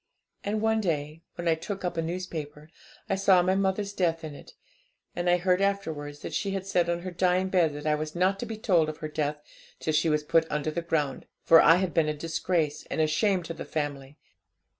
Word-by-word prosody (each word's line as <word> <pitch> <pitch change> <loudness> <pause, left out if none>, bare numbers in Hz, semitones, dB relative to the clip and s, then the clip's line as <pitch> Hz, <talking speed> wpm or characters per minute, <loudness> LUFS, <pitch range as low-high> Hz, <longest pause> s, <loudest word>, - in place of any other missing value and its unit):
And 210 +1 -1
one 220 0 +2
day, 155 -3 -2
when 175 - -4
I 165 - +5
took 190 +4 -5
up 175 - -2
a 165 - 0
newspaper, 160 -3 -5 0.4
I - - 0
saw 190 -2 +4
my 185 +1 +2
mother's 195 +1 0
death 165 -4 0
in 155 -2 -6
it; - - -13 0.6
and 175 0 0
I 175 - +5
heard 180 +1 +1
afterwards 160 -8 -2
that - - -6
she 195 -1 -1
said 180 -3 +1
on 170 0 -1
her 185 +1 -5
dying 185 +1 +1
bed 175 -5 +2
that 145 0 -7
I 155 - +3
was 155 +1 -3
not 190 +3 +2
to - - -4
be 220 0 -5
told 175 -7 +2
of 155 - -6
her 155 - -5
death 150 -1 -3 0.4
till 155 - -1
she 155 +2 +2
was 150 -1 +1
put 160 +2 +2
under 150 +1 -1
the 170 - -2
ground, 150 -5 -2 0.2
for 165 0 +7
I 165 - +7
had 180 -1 -1
been 160 -2 +2
a 150 - -2
disgrace 160 -1 -1
and - - -3
a 155 - +4
shame 180 +4 +1
to 165 - -5
the - - -7
family. 145 -2 -4
165 Hz, 225 wpm, -27 LUFS, 155-185 Hz, 0.6 s, for